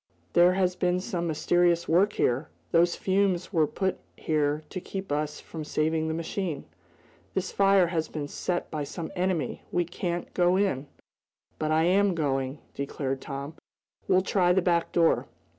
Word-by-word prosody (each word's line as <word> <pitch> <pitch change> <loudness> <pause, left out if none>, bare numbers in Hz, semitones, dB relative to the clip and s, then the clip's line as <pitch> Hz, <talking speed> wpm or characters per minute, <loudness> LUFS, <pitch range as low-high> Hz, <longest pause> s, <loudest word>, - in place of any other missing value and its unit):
"There 175 +1 +6
has 185 -1 +1
been 180 0 +1
some 180 -3 -3
mysterious 170 +2 +2
work 190 +6 +3
here! 130 +6 0 0.2
Those 170 +1 +4
fumes 190 -1 0
were 160 -3 +3
put 190 +3 -2 0.2
here 150 -1 0
to 185 - -4
keep 190 -3 -6
us 150 +1 -1
from 160 -2 -7
saving 155 +1 0
the 160 - -1
machine. 165 -1 -3 0.7
This 190 0 -1
fire 195 -2 +4
has 165 -2 -1
been 150 -2 -5
set 175 +4 -3
by 150 -2 -2
some 160 +3 -6
enemy! 180 -3 -1
We 175 - +1
can't 175 0 -4
go 180 +1 +3
in!" 150 -9 0 0.7
"But 155 - -1
I 155 +1 +3
am 190 +2 +3
going!" 135 -3 -1 0.2
declared 135 -1 -3
Tom. 140 +1 -6 0.5
"We'll 185 0 +4
try 180 -2 +2
the 190 0 +2
back 170 -2 +1
door." 165 -1 +3
170 Hz, 160 wpm, -27 LUFS, 155-185 Hz, 0.7 s, There